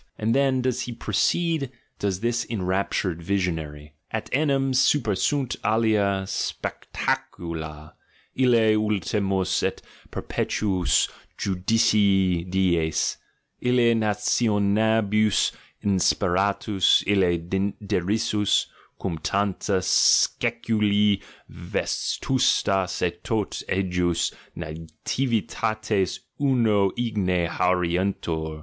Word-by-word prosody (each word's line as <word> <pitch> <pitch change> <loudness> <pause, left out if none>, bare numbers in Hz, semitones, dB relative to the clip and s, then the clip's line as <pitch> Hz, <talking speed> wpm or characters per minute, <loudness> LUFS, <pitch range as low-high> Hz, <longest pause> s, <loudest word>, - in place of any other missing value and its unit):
And 110 +1 0
then 135 -1 +2
does 125 -1 0
he 120 - -5
proceed, 150 - 0 0.3
does 95 -2 -2
this 120 0 0
enraptured 95 -3 -1
visionary: 80 -5 -3 0.2
"at 110 - -5
enim 135 -2 +1
super 130 -3 +3
sunt 135 +6 -1
alia 105 -3 +1
spectacula, 80 -5 -4 0.4
Me 130 - +2 0.3
ultimas 100 -2 0
et - - -1 0.3
perpetuus 95 -5 0 0.3
judicii 95 -2 +2
dies, 85 -4 +1 0.4
Me 125 -1 +3
nationibus 110 0 +2 0.3
insperatus, 95 0 +2
Me 95 0 +1
derisus, 105 +2 +1 0.3
cum 85 -5 -3
tanta 100 +2 -1
sceculi 105 -2 +2 0.3
vetustas 95 -9 0
et 85 0 -2
tot 110 -3 -2
ejus 90 -2 0 0.3
nativitates 105 +3 -2 0.2
uno 115 -8 +3
igne 100 -7 0
haurientur. 90 -3 -1
100 Hz, 80 wpm, -24 LUFS, 90-110 Hz, 0.4 s, super